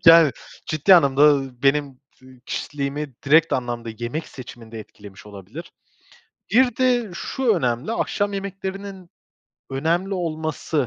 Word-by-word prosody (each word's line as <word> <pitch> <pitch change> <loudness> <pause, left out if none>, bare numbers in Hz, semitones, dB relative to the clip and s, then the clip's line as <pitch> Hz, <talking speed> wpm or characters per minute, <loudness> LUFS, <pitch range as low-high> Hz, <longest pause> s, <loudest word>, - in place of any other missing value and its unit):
Yani 165 -4 +8 0.3
ciddi 155 +5 +5
anlamda, 140 -5 +4
ııı, 135 -4 +3
benim 145 +1 +3 0.4
ı 130 -1 -17
kişiliğimi 145 -1 -4
direkt 155 +3 +4
anlamda 120 -2 -2
yemek 120 +7 -4
seçiminde 115 -3 -10
etkilemiş 100 -2 -14
olabilir. 105 - -10 0.8
Bir 245 -1 +4
de 245 -4 +2
şu 240 +5 0
önemli, 125 - -1
akşam 205 -3 -1
yemeklerinin 195 -1 -6 0.6
önemli 170 +8 0
olması 155 -4 -2
150 Hz, 115 wpm, -22 LUFS, 130-190 Hz, 0.8 s, Yani